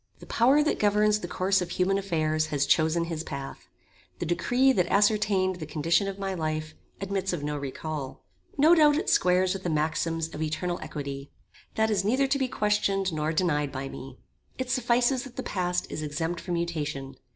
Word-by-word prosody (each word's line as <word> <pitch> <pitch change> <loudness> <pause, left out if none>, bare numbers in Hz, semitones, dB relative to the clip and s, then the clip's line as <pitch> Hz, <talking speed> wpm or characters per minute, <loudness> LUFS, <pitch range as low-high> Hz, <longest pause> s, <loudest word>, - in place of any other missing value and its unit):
The - - -13
power 270 +6 +4
that 305 - 0
governs 210 0 +3
the 175 - -5
course 190 +2 +1
of 180 - -3
human 195 +2 +1
affairs 155 -5 0
has 145 -2 0
chosen 160 +3 +2
his 165 -1 -4
path. 140 - -7 0.5
The - - -3
decree 245 +11 +2
that 180 -9 +1
ascertained 200 -2 +2
the 155 -3 -7
condition 165 +5 +1
of 195 0 -4
my 195 -1 -3
life, 155 -2 -3 0.3
admits 195 -1 -2
of 160 -5 -3
no 150 0 -2
recal. 140 0 -5 0.3
No 305 +4 +6
doubt 300 -3 +6
it 350 - 0
squares 180 +1 +3
with 195 - -5
the 180 - -2
maxims 160 +1 -1
of 155 - -6
eternal 160 +3 -2
equity. 140 -1 -6 0.5
That 220 0 +2
is 195 -3 +1
neither 255 +7 +2
to 275 +1 0
be 265 - +1
questioned 200 -4 0
nor 155 0 -1
denied 150 -4 0
by 135 0 -5
me. 130 -1 -9 0.4
It 260 -1 -3
suffices 245 0 +2
that 260 -3 -11
the 260 - -4
past 180 -2 -1
is - - -4
exempt 160 +3 -3
from 175 - -3
mutation. 145 -5 -3
180 Hz, 190 wpm, -27 LUFS, 155-210 Hz, 0.5 s, No